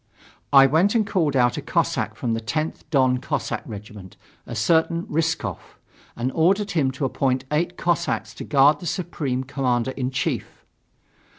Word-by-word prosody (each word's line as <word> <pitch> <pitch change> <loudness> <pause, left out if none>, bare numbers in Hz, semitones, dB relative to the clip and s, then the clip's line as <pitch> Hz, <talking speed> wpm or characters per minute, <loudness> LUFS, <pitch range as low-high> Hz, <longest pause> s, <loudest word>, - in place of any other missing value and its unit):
I 135 -1 +8
went 165 - +3
and 220 -2 +3
called 165 -8 0
out 120 -2 +3
a - - -3
Cossack - - -1
from 120 -2 -2
the 115 - -2
10th 155 +9 -2
Don 130 -4 +3
Cossack 130 - -3
regiment, 105 -3 -10 0.3
a - - -6
certain 165 +1 +2
Rysskov, 160 - -1 0.6
and 120 +2 -2
ordered 195 +7 +2
him 150 -7 +1
to 135 +1 -2
appoint 130 0 0
eight 170 +4 0
Cossacks 170 -10 -1
to - - -5
guard 145 +1 +4
the 175 - -6
Supreme 150 -7 -2
Commander 130 -2 -1
in 130 -1 -3
Chief. 130 - -3
140 Hz, 160 wpm, -23 LUFS, 125-165 Hz, 0.6 s, I